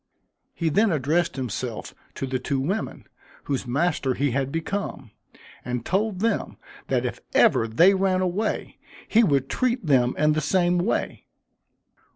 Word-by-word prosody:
He 165 -2 0
then 205 +6 +3
addressed 155 +3 0
himself 125 -3 -4 0.2
to - - -3
the 130 -1 -2
two 135 +1 -2
women, 190 +11 -3 0.4
whose 135 -3 -3
master 140 -1 0
he 140 -1 0
had 135 +1 -1
become, 165 - -4 0.5
and 125 -1 -4
told 195 0 0
them 230 -1 -1 0.3
that - - 0
if - - -4 0.2
ever 115 - +4
they 170 - +5
ran 190 -1 +1
away, 185 +4 -2 0.3
he 230 +2 +4
would 140 - +2
treat 250 - -1
them 130 -4 +3
in 150 0 +3
the 155 - 0
same 175 +3 +2
way. 185 +6 -2
155 Hz, 150 wpm, -24 LUFS, 130-190 Hz, 0.5 s, they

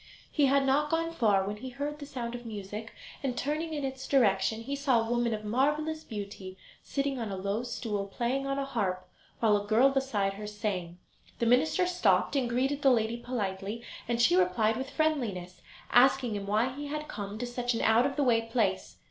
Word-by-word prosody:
He 290 -3 +3
had 275 0 +3
not 290 +3 +2
gone 330 +1 0
far, 210 -11 +2
when 205 +1 -4
he 260 +5 -7
heard 290 +3 -4
the 285 - -8
sound 240 -4 -5
of 240 0 -6
music, 215 0 -6 0.3
and, 260 -3 -2
turning 305 +4 -2
in 290 - -3
its 265 0 -5
direction, 220 -4 +2
he 275 +4 -3
saw 275 -4 +2
a 225 - -1
woman 240 -1 +1
of 215 -1 -3
marvellous 295 +7 0
beauty 200 -3 -7 0.2
sitting 275 -2 -2
on 225 -3 -3
a 195 - -3
low 200 +4 -1
stool 215 -4 -3
playing 250 +7 -1
on 275 0 -1
a 275 - -1
harp, 195 -8 -2 0.3
while 220 -2 +5
a 205 0 -2
girl 240 +6 +5
beside 230 -8 0
her 210 +1 -7
sang. 200 -5 -3 0.4
The 235 - 0
minister 290 - +3
stopped 360 -4 +2
and 255 -3 +1
greeted 265 +4 0
the 275 - +5
lady 230 -2 +2
politely, 215 -2 -4 0.2
and 235 0 0
she 235 -7 +5
replied 185 +5 +3
with 265 +3 -4
friendliness, 225 - -1 0.3
asking 250 -2 +4
him 200 -1 -4
why 220 +5 +1
he 290 +2 -6
had 300 +1 -4
come 205 -3 -6
to 245 - -3
such 245 0 -2
an - - -1
out 230 +4 +4
of 275 - -5
the 290 - +1
way 235 -3 +4
place. 225 -4 -1
240 Hz, 205 wpm, -30 LUFS, 210-275 Hz, 0.4 s, while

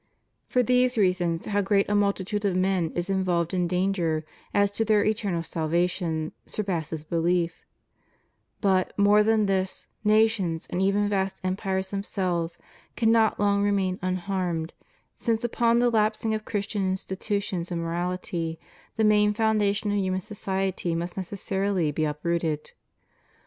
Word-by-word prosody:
For 250 - +2
these 250 +1 +3
reasons 180 -4 +1
how 205 -1 +1
great 200 0 +2
a 205 - 0
multitude 205 0 0
of 195 -3 +1
men 185 -3 +1
is 175 0 -1
in 190 -1 0
volved 170 -1 0
in 180 -1 +1
danger 180 -3 0 0.3
as 200 0 +2
to 225 - 0
their 215 -1 +3
eternal 205 -6 0
salvation 165 0 -1
surpasses 165 -6 -3
belief; 170 +1 -1 0.9
but, 190 -2 +1
more 205 +1 +5
than 215 0 +3
this, 190 -1 -1 0.2
nations 210 -6 +2
and 180 - -1
even 200 +2 +2
vast 195 -1 -1
empires 190 0 -2
themselves 180 -4 -2 0.4
cannot 225 -1 +3
long 200 0 +2
remain 195 -2 +1
unharmed, 180 -3 -2 0.4
since 230 -2 -1
upon 235 0 +2
the 240 0 +3
lapsing 220 0 +1
of 215 0 -3
Christian 205 -2 -1
institutions 190 -1 -3
and 170 - -1
morality, 170 -1 -3 0.4
the 225 - +1
main 210 -1 +4
foundation 215 -1 +1
of 205 - +1
himian 185 -1 0
society 190 -4 -2
must 170 +3 -3
necessarily 190 -3 -1
be 155 +2 0
uprooted. 155 0 -2
190 Hz, 140 wpm, -26 LUFS, 175-210 Hz, 0.9 s, more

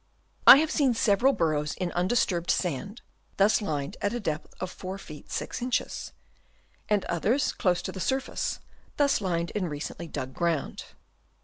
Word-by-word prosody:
I - - +13
have 315 +2 +1
seen 270 -6 +2
several 225 +4 +4
burrows 155 - 0
in 180 -2 -3
undisturbed 175 -2 0
sand 180 - -1 0.3
thus 205 +3 +4
lined 145 -8 -3
at 205 +4 0
a - - -2
depth 155 -8 -3
of 185 -1 -4
4 185 +1 -6
ft. 155 -6 -11
6 - - -4
in.; 250 +1 -3 1.2
and 210 -2 +2
others 225 - +1
close 180 -4 +1
to - - -4
the 190 - -7
surface 265 +7 -2 0.4
thus 280 -5 +3
lined 170 -3 -1
in 185 -5 -2
recently 150 +3 -6
dug 130 -4 -5
ground. 170 -3 -1
185 Hz, 155 wpm, -27 LUFS, 165-225 Hz, 1.2 s, I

